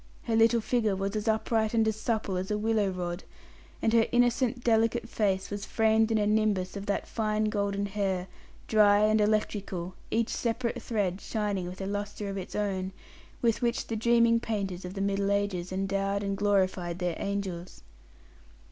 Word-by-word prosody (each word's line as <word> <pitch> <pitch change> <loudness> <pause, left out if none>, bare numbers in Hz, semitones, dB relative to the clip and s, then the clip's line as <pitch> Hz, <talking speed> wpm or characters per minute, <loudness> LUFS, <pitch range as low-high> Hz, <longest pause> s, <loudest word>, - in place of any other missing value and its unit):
Her 230 - -1
little 225 +1 +4
figure 220 -3 +1
was 195 +2 -2
as 215 +1 -2
upright 220 0 +1
and 225 -1 +3
as 220 - +1
supple 220 -3 -1
as 185 +1 -3
a 210 - 0
willow 215 -2 +1
rod; 175 -1 -4 0.6
and 225 - +2
her 230 -1 +4
innocent, 245 0 +2
delicate 230 0 +2
face 195 -5 0
was 205 0 -4
framed 220 0 +2
in 225 - +2
a 210 - +2
nimbus 210 -3 +1
of 200 +1 -6
that 200 - -1
fine 215 -1 0
golden 200 -1 0
hair 195 -2 -1 0.4
dry 205 -1 +5
and 215 0 +4
electrical, 205 -4 -1 0.2
each 230 0 +1
separate 235 0 -2
thread 200 -5 -1
shining 205 -5 -2
with 185 +2 -7
a - - -3
lustre 205 +1 -4
of 195 - -4
its 185 - -8
own 190 -2 -2 0.5
with 230 -1 +2
which 235 -1 0
the 225 - -3
dreaming 235 +1 +4
painters 195 -5 -3
of 180 +2 -7
the 195 - -3
middle 200 0 0
ages 200 -3 -1
endowed 195 +1 -1
and 200 0 -1
glorified 190 -4 +1
their 180 -2 -1
angels. 190 - -4
205 Hz, 175 wpm, -29 LUFS, 195-220 Hz, 0.6 s, dry